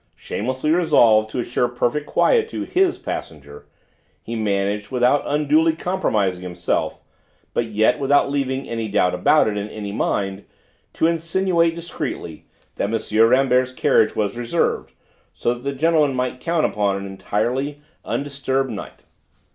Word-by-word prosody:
Shamelessly 130 +7 -2
resolved 120 -11 +4
to 110 - -6
assure 120 0 0
perfect 120 +4 -1
quiet 455 -2 +2
to - - -4
"his" 370 -1 +1
passenger, 75 -2 -7 0.6
he 115 - -5
managed, 100 -1 -1
without 125 +3 +2
unduly 150 +2 +2
compromising 105 - -1
himself 90 -1 -2 0.6
but 120 - 0
yet 110 +4 +2
without 140 0 +3
leaving 135 -1 -2
any 115 -1 -3
doubt 90 -3 +2
about 100 +12 +3
it 105 -1 -1
in 105 +1 -4
any 105 -2 -6
mind, 100 -1 -2 0.5
to - - +1
insinuate 170 0 +1
discreetly 150 - -6 0.3
that 100 - -1
M. 115 0 +3
Rambert's 130 0 +3
carriage 120 -3 +2
was 105 +2 -1
reserved, 120 -1 -1 0.4
so 120 - 0
that 120 - -10
that 140 +1 -4
gentleman 155 -2 +2
might 125 0 -2
count 165 +2 0
upon 100 -2 0
an 100 - -6
entirely 120 +9 -2 0.2
undisturbed 135 -2 -2
night. 105 - -8
125 Hz, 140 wpm, -21 LUFS, 105-150 Hz, 0.6 s, resolved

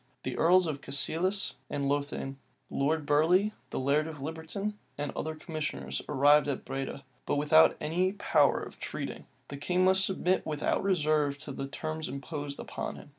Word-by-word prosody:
The 130 - -3
earls 180 +2 +5
of 150 -4 -3
Cassilis 175 +8 0 0.2
and 140 -1 -1
Lothian, 140 -1 -2 0.3
Lord 150 +2 0
Burley, 175 +8 +3 0.2
the - - -3
laird 145 +4 +2
of 160 -2 -7
Liberton, 160 +8 -4 0.2
and 145 0 -2
other 160 0 -4
commissioners, 70 - -4
arrived 145 +1 +5
at 140 - -3
Breda; 135 +1 -4 0.2
but - - +1
without 150 +2 +5
any 180 +5 +1
power 205 - +3
of - - -10
treating: - - -5 0.2
the 140 - -6
king 180 +5 +1
must 190 +1 +5
submit 185 -1 +1
without 150 -1 0
reserve 155 -6 +2
to 145 - -6
the 135 0 -4
terms 155 +2 -4
imposed 145 +1 -5
upon - - -5
him. - - -12
150 Hz, 165 wpm, -30 LUFS, 140-170 Hz, 0.3 s, earls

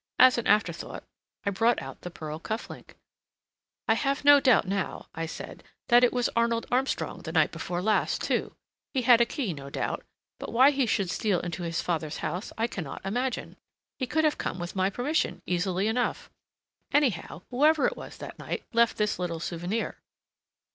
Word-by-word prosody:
As 255 -1 +7
an 235 - -3
afterthought 210 - +1 0.4
I 200 - +1
brought 225 +5 +2
out - - -9
the 180 - -6
pearl 155 -2 -7
cuff 220 +6 -4
link. - - -12 0.9
"I 225 - +5
have 275 +4 -1
no 290 0 +9
doubt 255 -7 +4
now," 195 -1 -2
I 165 0 -3
said, - - -8 0.3
"that 240 0 +7
it 245 - +5
was 245 -1 +1
Arnold 235 0 +1
Armstrong 260 +2 0
the - - -6
night - - +3
before 175 0 -4
last, 215 +1 +2
too. - - -1 0.4
He 260 - +1
had 235 -1 +7
a 235 - +4
key, 235 - -2
no 140 -2 -8
doubt, - - -3 0.4
but - - -6
why 260 +4 +6
he 270 -3 +1
should 195 -4 0
steal 205 -6 +1
into 175 0 -5
his 165 -2 -2
father's 160 -3 -2
house 180 +3 -4
I 225 - +1
can 200 -6 -4
not 150 - -8
imagine. 245 +5 -2 0.4
He 255 - -1
could 315 +4 +1
have 305 -1 +2
come - - -3
with 175 +1 -6
my 190 0 +2
permission, 255 +9 -1
easily 180 +2 0
enough. 245 +2 -1 0.6
Anyhow, 250 - +1
whoever 300 +4 +4
it - - +1
was - - -9
that - - -9
night, - - -4
left 235 0 +3
this 210 -2 0
little 170 -2 -2
souvenir." 175 +6 -3
220 Hz, 190 wpm, -28 LUFS, 180-250 Hz, 0.9 s, no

